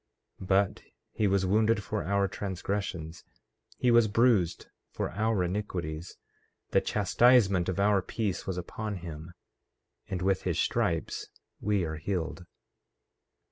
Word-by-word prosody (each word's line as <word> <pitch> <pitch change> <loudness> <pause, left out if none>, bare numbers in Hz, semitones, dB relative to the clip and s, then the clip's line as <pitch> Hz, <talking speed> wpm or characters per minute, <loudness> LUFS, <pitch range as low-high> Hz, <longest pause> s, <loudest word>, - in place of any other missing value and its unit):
14:5 95 - -7
But 95 0 +2 0.3
he 105 - +1
was 95 -1 +2
wounded 105 +2 +2
for - - -3
our 100 +3 +1
transgressions, 95 -4 -4 0.5
he 125 - +3
was 120 -2 +6
bruised 110 -5 +2 0.2
for - - -3
our 105 0 +1
iniquities; 90 -4 -4 0.5
the - - +4
chastisement 105 -3 +3
of 95 - -2
our 100 -1 +4
peace 100 -1 -3
was 95 -2 -2
upon 105 +4 -4
him; 85 -1 -8 0.7
and 90 -1 -3
with 95 0 +2
his - - -1
stripes - - 0 0.3
we 105 -2 +1
are 80 -1 -4
healed. 85 0 -3
95 Hz, 130 wpm, -29 LUFS, 90-105 Hz, 0.7 s, was